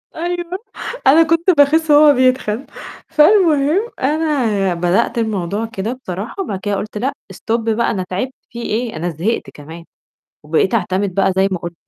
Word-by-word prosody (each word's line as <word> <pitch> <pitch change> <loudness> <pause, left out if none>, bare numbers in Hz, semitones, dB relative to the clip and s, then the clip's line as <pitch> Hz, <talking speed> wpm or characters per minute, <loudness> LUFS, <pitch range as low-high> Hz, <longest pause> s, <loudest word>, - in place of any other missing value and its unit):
أيوه 350 +2 -3 0.5
أنا 320 +4 +7
كنت 330 +3 +1
باخس 305 +2 +4
وهو 295 0 +7
بيتخن، 255 -1 +1 0.4
فالمهم 325 +3 +3
أنا 260 - 0
بدأت 175 +6 0
الموضوع 210 -1 -2
كده 225 +1 -4
بصراحة 200 - -5
وبعد 195 - -5
كده 205 +1 -2
قلت: 210 +2 -5
"لأ 260 +6 -1 0.2
stop 230 +5 -2
بقى 225 +1 0
أنا 185 -4 -3
تعبت 225 +8 -3 0.2
فيه 235 - -7
إيه 225 -1 -2
أنا 170 +3 -3
زهقت 175 +9 -2
كمان" 160 +3 -11 0.6
وبقيت 160 +8 0
أعتمد 190 -2 -1
بقى 195 0 +2
زي 195 +1 +3
ما 185 - -1
ك 170 0 -7
225 Hz, 155 wpm, -17 LUFS, 190-295 Hz, 0.6 s, أنا